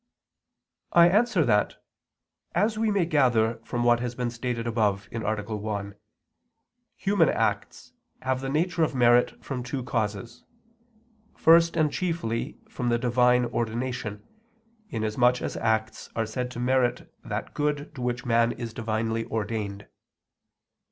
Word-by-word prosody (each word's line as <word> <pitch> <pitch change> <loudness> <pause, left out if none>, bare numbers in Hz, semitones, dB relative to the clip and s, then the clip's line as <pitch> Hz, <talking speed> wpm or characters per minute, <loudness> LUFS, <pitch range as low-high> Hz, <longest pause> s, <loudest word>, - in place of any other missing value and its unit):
I 170 0 +7
answer 225 +6 +3
that, - - +2 0.8
As 215 +1 +2
we 220 0 +1
may 200 -4 +2
gather 120 -8 +2
from 120 0 -2
what 120 0 +4
has 120 0 -4
been 125 -1 -2
stated 120 0 -3
above 105 -4 0
(A. 115 - -4 0.4
1), 100 -1 -4 1.0
human 195 -6 +2
acts - - -2 0.3
have 130 0 0
the 135 - -3
nature 170 +4 0
of 155 -3 +1
merit 120 -1 +3
from 130 -3 -3
two 125 +1 -4
causes: 115 +1 -3 0.9
first 170 +1 +5
and 155 -2 +2
chiefly 165 -11 -2
from 125 -2 -3
the 120 - +2
Divine 125 +1 +3
ordination, 115 -2 -3 0.6
inasmuch 120 +3 +1
as - - -4
acts 110 -1 -1
are 115 - 0
said 125 +3 -3
to 125 - -7
merit 125 0 0
that - - -5
good 145 0 -2
to 135 - -8
which 120 0 -2
man 115 0 +3
is 115 -2 -6
divinely 115 0 -2
ordained. 105 -2 -3
120 Hz, 135 wpm, -26 LUFS, 115-135 Hz, 1.0 s, I